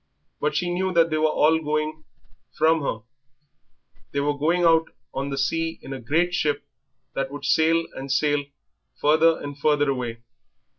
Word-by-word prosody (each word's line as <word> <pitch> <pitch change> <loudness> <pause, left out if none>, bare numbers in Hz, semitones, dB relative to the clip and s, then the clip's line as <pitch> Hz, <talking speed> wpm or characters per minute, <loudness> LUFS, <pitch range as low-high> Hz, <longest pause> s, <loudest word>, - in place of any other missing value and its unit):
But 150 0 -1
she 175 +2 0
knew 190 +1 0
that 165 -1 +4
they 155 - +1
were 155 - +3
all 155 +1 +3
going 155 0 -2 0.5
from 160 +1 +3
her, 115 -5 -3 1.1
they 140 - 0
were 145 +1 0
going 165 +5 +1
out 165 -1 +4 0.2
on 140 +1 -3
the 140 - -3
sea 165 +4 -1
in 135 - -7
a 135 - -6
great 165 +9 +1
ship 145 -4 0 0.5
that 135 - -2
would 145 +1 -7
sail 165 +1 +3
and 135 0 -5
sail 145 +1 +2 0.6
further 160 +2 +4
and 145 0 -6
further 145 -1 +2
away. 120 -3 -4
155 Hz, 165 wpm, -24 LUFS, 140-165 Hz, 1.1 s, that